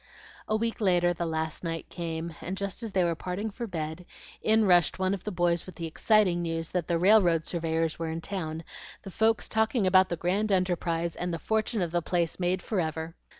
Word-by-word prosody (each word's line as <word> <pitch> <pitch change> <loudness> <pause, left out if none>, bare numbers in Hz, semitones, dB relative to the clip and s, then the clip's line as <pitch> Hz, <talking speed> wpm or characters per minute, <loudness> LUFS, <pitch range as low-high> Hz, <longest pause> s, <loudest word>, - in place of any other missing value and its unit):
A 215 - +1
week 230 +1 -2
later 175 -3 +3
the 170 0 -3
last 160 0 -2
night 165 -1 -4
came, 165 -1 -4
and 185 +2 -4
just 200 +2 -3
as 225 -2 -3
they 185 - +3
were 170 -1 +1
parting 185 +6 -4
for 235 +3 -5
bed, 160 -1 -5 0.3
in 220 0 +4
rushed 175 -4 +4
one 185 +1 +1
of 195 - -5
the 210 - -2
boys 175 -1 0
with 185 - -10
the 170 - -5
exciting 180 +1 +2
news 165 -1 -2
that 180 -3 -1
the 170 - +1
railroad 175 -3 +4
surveyors 165 -1 -1
were 165 -1 -2
in 160 +1 -3
town, 165 -3 -4 0.4
the 195 - -8
folks 220 +3 +2
talking 220 0 +1
about 185 0 +5
the 170 - -1
grand 195 +6 0
enterprise, 175 -3 0
and 180 0 -3
the 165 - -2
fortune 220 +3 0
of 170 - -3
the 175 0 +1
place 170 0 -1
made 180 0 0
forever. 160 -5 -2
175 Hz, 210 wpm, -28 LUFS, 165-195 Hz, 0.4 s, about